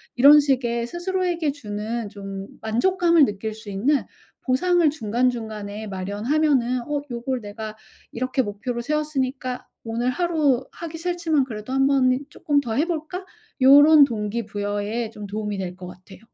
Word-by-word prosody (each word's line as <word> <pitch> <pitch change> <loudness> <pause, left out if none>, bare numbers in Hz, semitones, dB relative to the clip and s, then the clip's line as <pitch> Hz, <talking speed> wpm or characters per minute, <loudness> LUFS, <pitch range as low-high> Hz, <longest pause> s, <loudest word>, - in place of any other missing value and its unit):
이런 285 +4 +8
식의 250 -5 0
스스로에게 345 +1 -1
주는 220 -3 -5
좀 195 -1 -7
만족감을 335 +8 +3
느낄 215 0 -4
수 220 -1 -11
있는 260 +10 +1 0.4
보상을 340 +6 +2
중간중간에 220 -5 -2
마련하면은 240 +7 0
어 295 -1 -1
'요걸 245 +1 -3
내가 215 +1 -7 0.4
이렇게 255 +2 -1
목표로 235 +3 -4
세웠으니까 265 -3 -2 0.2
오늘 235 +2 -1
하루 295 -5 +1
하기 330 -1 -7
싫지만 335 -4 +1
그래도 220 0 -6
1 270 0 +3
번 270 -2 +4
이 255 - -1
쪼끔 290 -1 0
더 235 -5 -4
해 290 +6 +2
볼까?' 345 +2 -4 0.4
요런 290 +3 +8
동기 225 -3 -1
부여에 205 +2 -3
좀 210 -2 -9
도움이 210 0 -3
될 180 -2 -4
것 180 0 -9
같아요. 180 +2 -13
250 Hz, 315 characters per minute, -23 LUFS, 215-295 Hz, 0.4 s, 이런